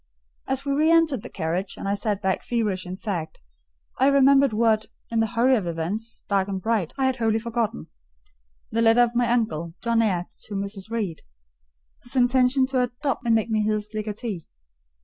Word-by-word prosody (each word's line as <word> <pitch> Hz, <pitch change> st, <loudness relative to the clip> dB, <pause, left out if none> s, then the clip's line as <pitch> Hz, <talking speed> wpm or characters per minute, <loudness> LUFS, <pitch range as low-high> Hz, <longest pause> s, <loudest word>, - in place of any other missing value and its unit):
As 270 Hz, +1 st, -2 dB
we 280 Hz, -, -1 dB
re 305 Hz, +3 st, +3 dB
entered 325 Hz, -7 st, +3 dB
the -, -, -9 dB
carriage, 180 Hz, +3 st, -3 dB
and -, -, -5 dB
I 200 Hz, -, +1 dB
sat 205 Hz, -1 st, -2 dB
back 190 Hz, -1 st, +1 dB
feverish 210 Hz, -6 st, -1 dB
and 185 Hz, +1 st, -6 dB
fagged, 170 Hz, -7 st, -4 dB, 0.6 s
I 265 Hz, -, +5 dB
remembered 275 Hz, -1 st, +5 dB
what, 220 Hz, 0 st, +2 dB, 0.2 s
in 230 Hz, -, +1 dB
the 225 Hz, -, +2 dB
hurry 245 Hz, +4 st, +3 dB
of 200 Hz, -7 st, -1 dB
events, 180 Hz, +8 st, -4 dB
dark 195 Hz, -1 st, +1 dB
and 195 Hz, -1 st, -3 dB
bright, 210 Hz, -4 st, 0 dB
I 265 Hz, -, +1 dB
had 260 Hz, -1 st, +1 dB
wholly 225 Hz, -1 st, +1 dB
forgotten—the -, -, -6 dB
letter 230 Hz, +1 st, +6 dB
of 240 Hz, 0 st, 0 dB
my 240 Hz, -1 st, +1 dB
uncle, 170 Hz, -9 st, -1 dB
John 230 Hz, -1 st, +1 dB
Eyre, 185 Hz, -6 st, +1 dB, 0.2 s
to 205 Hz, -, -7 dB
Mrs. 200 Hz, +1 st, -4 dB
Reed: 210 Hz, -8 st, -3 dB, 0.8 s
his 245 Hz, -, -10 dB
intention 255 Hz, +1 st, +4 dB
to 260 Hz, -2 st, +1 dB
adopt 250 Hz, +2 st, -2 dB
me -, -, -5 dB
and 230 Hz, -, +4 dB
make 225 Hz, +1 st, 0 dB
me 215 Hz, -1 st, +2 dB
his 210 Hz, 0 st, -1 dB
legatee. 215 Hz, -4 st, -4 dB
220 Hz, 190 wpm, -24 LUFS, 190-245 Hz, 0.8 s, letter